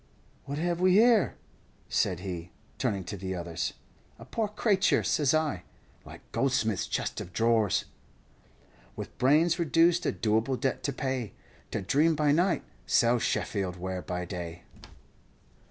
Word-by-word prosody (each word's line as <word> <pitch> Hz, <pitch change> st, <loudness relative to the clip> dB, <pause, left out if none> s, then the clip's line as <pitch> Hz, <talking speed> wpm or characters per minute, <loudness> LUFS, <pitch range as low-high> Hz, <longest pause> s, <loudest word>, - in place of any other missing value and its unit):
"'What 140 Hz, +1 st, -4 dB
have 175 Hz, +2 st, -1 dB
we 185 Hz, 0 st, +5 dB
here?' 225 Hz, 0 st, +5 dB, 0.5 s
said 90 Hz, -1 st, 0 dB
he, 90 Hz, -3 st, -5 dB, 0.3 s
turning 105 Hz, -7 st, -1 dB
to 100 Hz, -, -6 dB
the 95 Hz, -1 st, -4 dB
others. 85 Hz, -2 st, -3 dB, 0.4 s
"'A 115 Hz, -, -12 dB
poor 220 Hz, -, -1 dB
crayture,' 205 Hz, -1 st, +2 dB
says 145 Hz, -4 st, +2 dB
I, 155 Hz, -, 0 dB, 0.4 s
'like -, -, -11 dB
Goldsmith's 115 Hz, -7 st, 0 dB
chest -, -, -2 dB
of 90 Hz, -, -9 dB
drawers, 115 Hz, -1 st, +2 dB, 1.1 s
"'With -, -, -7 dB
brains 155 Hz, +7 st, +4 dB
reduced 170 Hz, +2 st, +3 dB
a -, -, +2 dB
doable 110 Hz, +4 st, 0 dB
debt 135 Hz, -, -1 dB
to 140 Hz, -, +1 dB
pay, 130 Hz, -4 st, -3 dB, 0.4 s
To -, -, -3 dB
dream 155 Hz, -, +3 dB
by 150 Hz, -1 st, +2 dB
night, 175 Hz, +4 st, +2 dB, 0.2 s
sell 120 Hz, -1 st, +4 dB
Sheffield 95 Hz, -5 st, -1 dB
ware 90 Hz, +1 st, -4 dB
by 90 Hz, 0 st, -4 dB
day.' 85 Hz, -1 st, -6 dB
130 Hz, 140 wpm, -29 LUFS, -, 1.1 s, we